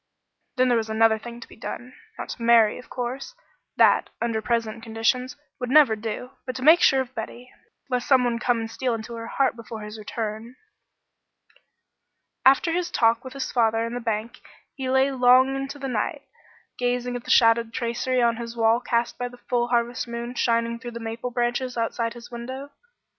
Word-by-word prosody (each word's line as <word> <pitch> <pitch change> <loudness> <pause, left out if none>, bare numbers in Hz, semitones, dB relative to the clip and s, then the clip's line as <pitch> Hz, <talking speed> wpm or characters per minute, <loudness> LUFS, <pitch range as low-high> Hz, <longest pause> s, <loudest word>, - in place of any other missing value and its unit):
Then 255 0 +3
there 240 -2 +3
was 220 -1 -4
another 220 0 +3
thing 235 +1 -9
to - - -10
be - - -15
done. 245 +3 -7 0.2
Not - - -6
to - - -7
marry, 230 -2 +5
of 250 - -14
course; 255 - -5 0.4
that, - - +4
under 230 -2 -1
present 230 -1 -1
conditions, 225 +3 -1 0.2
would 250 - -3
never 275 -5 +6
do; 225 +3 -5 0.2
but 255 - -4
to 255 - -5
make 320 +4 +7
sure 265 0 +5
of 260 -1 -7
Betty, 240 +2 -7 0.4
lest 250 -2 -2
some 260 -2 +5
one 240 -1 0
come 240 -1 +1
and 225 0 -5
steal 245 0 -1
into 225 +1 -7
her 230 0 -6
heart 270 0 +1
before 230 -1 -8
his 210 +1 -8
return. 220 +2 -5 1.9
After 275 +5 +5
his 350 +1 -1
talk 230 -6 +2
with 260 -1 -9
his 275 -1 -4
father 225 -2 +2
in 230 - -5
the 245 - -3
bank 230 +1 -3 0.3
he 265 -2 -4
lay 265 +1 +3
long 255 +1 +5
into 270 +1 -4
the 275 -1 -5
night, 225 -5 -2 0.6
gazing 245 0 -1
at 245 - -5
the - - -11
shadowed 230 0 +4
tracery 240 +2 -1
on 235 -1 +2
his 235 0 -7
wall 225 +1 +4
cast 240 -1 -1
by 245 - -1
the 245 0 -12
full 240 0 -1
harvest 240 0 0
moon 235 +1 -5
shining 235 -1 0
through 240 -1 -7
the - - -6
maple 225 +2 -4
branches 245 +1 -1
outside 230 0 -1
his 240 0 -11
window. 260 +4 -7
240 Hz, 195 wpm, -24 LUFS, 230-255 Hz, 1.9 s, make